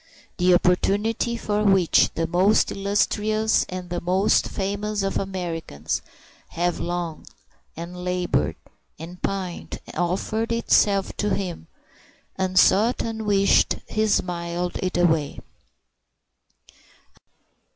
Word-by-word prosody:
The 180 Hz, -1 st, +4 dB
opportunity 210 Hz, +6 st, +1 dB
for 210 Hz, -2 st, -1 dB
which 195 Hz, -4 st, +4 dB
the 165 Hz, -, 0 dB
most 185 Hz, +6 st, +3 dB
illustrious 210 Hz, +2 st, +1 dB
and 180 Hz, -1 st, -7 dB
the 175 Hz, -, -2 dB
most 190 Hz, +4 st, +2 dB
famous 205 Hz, +1 st, -2 dB
of 195 Hz, -, -1 dB
Americans 170 Hz, -, -4 dB, 0.5 s
have 175 Hz, +1 st, -2 dB
longed 175 Hz, -2 st, -4 dB, 0.5 s
and 175 Hz, +2 st, -7 dB
labored 180 Hz, 0 st, 0 dB, 0.4 s
and 170 Hz, +3 st, -10 dB
pined 185 Hz, -3 st, -4 dB, 0.2 s
offered 195 Hz, +6 st, -1 dB
itself 205 Hz, -4 st, +2 dB
to 210 Hz, -1 st, 0 dB
him, 180 Hz, -, -5 dB, 0.7 s
unsought, 190 Hz, +5 st, +3 dB
unwished, 210 Hz, -3 st, +2 dB
and -, -, -16 dB
he 215 Hz, 0 st, +1 dB
smiled 175 Hz, -2 st, -1 dB
it 185 Hz, -1 st, -2 dB
away. 160 Hz, -5 st, +1 dB
185 Hz, 100 wpm, -23 LUFS, 175-205 Hz, 0.7 s, The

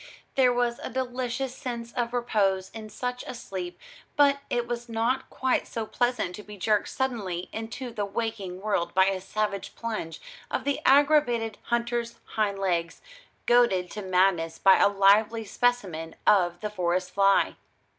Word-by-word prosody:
There 255 Hz, -2 st, +4 dB
was 240 Hz, -1 st, 0 dB
a -, -, -5 dB
delicious 255 Hz, 0 st, -3 dB
sense 235 Hz, -2 st, -6 dB
of 235 Hz, -1 st, -1 dB
repose 200 Hz, -6 st, 0 dB
in 220 Hz, -1 st, -8 dB
such 250 Hz, +3 st, -4 dB
a -, -, -5 dB
sleep, 185 Hz, -6 st, -6 dB, 0.4 s
but 280 Hz, -1 st, +4 dB
it 240 Hz, -1 st, -1 dB
was 240 Hz, 0 st, -4 dB
not 230 Hz, +4 st, 0 dB
quite 260 Hz, -1 st, 0 dB
so 225 Hz, -2 st, -4 dB
pleasant 245 Hz, -5 st, -1 dB
to -, -, -8 dB
be 210 Hz, 0 st, -11 dB
jerked 210 Hz, +2 st, +1 dB
suddenly 210 Hz, -10 st, -3 dB
into 230 Hz, +3 st, -6 dB
the 210 Hz, -3 st, -2 dB
waking 200 Hz, -3 st, -4 dB
world 185 Hz, -5 st, -1 dB
by 190 Hz, 0 st, +6 dB
a 190 Hz, -1 st, 0 dB
savage 205 Hz, +1 st, -3 dB
plunge 215 Hz, -8 st, -4 dB, 0.3 s
of -, -, -2 dB
the 285 Hz, -1 st, -1 dB
aggravated 265 Hz, -6 st, +4 dB
hunter's 235 Hz, 0 st, -1 dB, 0.2 s
hindlegs, 195 Hz, -5 st, 0 dB, 0.4 s
goaded 215 Hz, -7 st, +3 dB
to 210 Hz, -, -5 dB
madness 180 Hz, -3 st, +2 dB
by 195 Hz, -1 st, +6 dB
a -, -, +6 dB
lively 210 Hz, +3 st, +4 dB
specimen 195 Hz, -9 st, -1 dB
of 175 Hz, -3 st, +3 dB
the 210 Hz, -1 st, -3 dB
forest 180 Hz, -1 st, -1 dB
fly. 195 Hz, +1 st, +3 dB
220 Hz, 155 wpm, -27 LUFS, 190-245 Hz, 0.4 s, by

